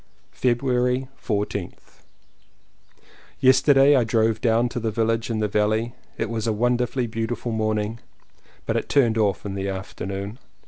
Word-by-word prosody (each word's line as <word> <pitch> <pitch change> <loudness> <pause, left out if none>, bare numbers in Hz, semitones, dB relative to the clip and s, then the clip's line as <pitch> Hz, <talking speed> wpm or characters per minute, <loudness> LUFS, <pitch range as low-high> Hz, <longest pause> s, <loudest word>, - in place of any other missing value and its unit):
February 125 +1 +1 0.2
14th. 100 -4 -4 1.4
Yesterday 135 +2 +5
I 125 - +4
drove 110 0 +1
down 115 0 +3
to 120 - -4
the 115 -1 -1
village 115 +1 0
in 110 -2 -1
the 105 - +1
valley. 110 +3 0 0.2
It 115 - -1
was 115 0 -3
a - - +2
wonderfully 120 +3 0
beau 115 0 -3
tiful 120 0 -4
morning, 110 0 -1 0.7
but - - -1
it - - -2
turned 115 -5 +3
off 100 -2 0
in 100 - -4
the 100 0 -3
afternoon. 100 +3 -5
115 Hz, 145 wpm, -23 LUFS, 105-125 Hz, 1.4 s, Yesterday